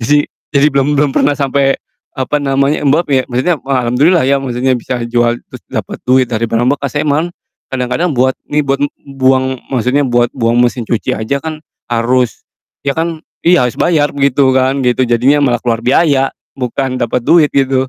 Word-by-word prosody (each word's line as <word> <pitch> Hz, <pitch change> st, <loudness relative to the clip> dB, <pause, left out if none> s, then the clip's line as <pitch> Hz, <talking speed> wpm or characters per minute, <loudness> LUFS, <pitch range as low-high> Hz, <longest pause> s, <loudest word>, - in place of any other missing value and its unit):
Jadi 145 Hz, +5 st, +2 dB, 0.2 s
jadi 140 Hz, -1 st, +3 dB
belum 140 Hz, 0 st, +1 dB
belum 145 Hz, -1 st, +2 dB
pernah 145 Hz, -, +2 dB
sampe 140 Hz, -1 st, +1 dB, 0.3 s
apa 145 Hz, +2 st, -2 dB
namanya 140 Hz, +2 st, +1 dB
Mbak 145 Hz, +4 st, +3 dB
piye 135 Hz, -3 st, +2 dB
maksudnya 130 Hz, +9 st, +1 dB
wah 130 Hz, -3 st, -1 dB
alhamdulillah 140 Hz, +6 st, +3 dB
ya 140 Hz, 0 st, +2 dB
maksudnya 130 Hz, 0 st, 0 dB
bisa 125 Hz, +1 st, -3 dB
jual 120 Hz, 0 st, +1 dB
terus -, -, -12 dB
dapet -, -, -5 dB
duit 130 Hz, 0 st, +3 dB
dari 115 Hz, -1 st, -3 dB
barang 115 Hz, +1 st, +1 dB
bekas 145 Hz, 0 st, -4 dB
emang, 150 Hz, +3 st, 0 dB, 0.4 s
kadang-kadang 130 Hz, +7 st, -1 dB
buat 130 Hz, -1 st, +1 dB, 0.2 s
nih 150 Hz, 0 st, 0 dB
buat 140 Hz, +1 st, 0 dB, 0.2 s
buang 130 Hz, -1 st, 0 dB
maksudnya 130 Hz, +2 st, +1 dB
buat 120 Hz, -2 st, +2 dB
buang 120 Hz, -2 st, +1 dB
mesin 120 Hz, 0 st, +1 dB
cuci 115 Hz, 0 st, -2 dB
aja 110 Hz, +6 st, -2 dB
kan 155 Hz, +1 st, -7 dB, 0.2 s
harus 120 Hz, 0 st, 0 dB, 0.4 s
ya 140 Hz, +2 st, -2 dB
kan 165 Hz, -1 st, -2 dB, 0.2 s
iya 175 Hz, -3 st, +5 dB
harus 125 Hz, -1 st, -2 dB
bayar 150 Hz, -4 st, +2 dB
gitu 140 Hz, -1 st, +3 dB
kan, 130 Hz, +1 st, +1 dB
gitu. 125 Hz, 0 st, +1 dB
Jadinya 125 Hz, +5 st, +3 dB
malah 125 Hz, -5 st, +1 dB
keluar 115 Hz, -2 st, 0 dB
biaya 135 Hz, 0 st, +2 dB, 0.2 s
bukan 130 Hz, +1 st, -2 dB
dapet 120 Hz, 0 st, -1 dB
duit 155 Hz, +3 st, +4 dB
gitu. 135 Hz, -1 st, +2 dB
135 Hz, 180 wpm, -14 LUFS, 125-145 Hz, 0.4 s, iya